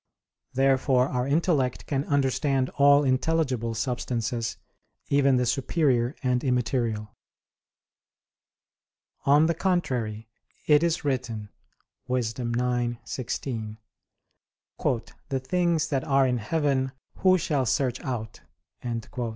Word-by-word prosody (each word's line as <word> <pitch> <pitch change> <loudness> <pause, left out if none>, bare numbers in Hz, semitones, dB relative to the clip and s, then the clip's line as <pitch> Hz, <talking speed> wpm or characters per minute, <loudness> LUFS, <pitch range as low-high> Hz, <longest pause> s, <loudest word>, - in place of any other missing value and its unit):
Therefore 135 0 +3
our 125 -1 -1
intellect 140 -4 +1
can 140 0 -1
understand 135 -1 +1
all 140 +1 +5
intelligible 130 -4 0
substances, 115 0 -2 0.5
even 140 -2 +4
the 125 - +1
superior 130 -1 +1
and 125 -1 +1
immaterial. 115 -4 -1 2.1
On 145 +3 +6
the 170 - +2
contrary, 125 - -1 0.4
It 150 -1 +5
is 165 -2 0
written 115 -6 -2 0.6
(Wis. 125 -3 0
9:16): 120 -1 -3 1.5
"The 135 - 0
things 165 +2 0
that 135 -3 0
are 135 -1 +3
in 125 -2 +1
heaven, 135 +1 0 0.2
who 185 0 +4
shall 145 -6 0
search 125 +1 0
out?" 115 -5 -5
130 Hz, 95 wpm, -26 LUFS, 120-145 Hz, 2.1 s, On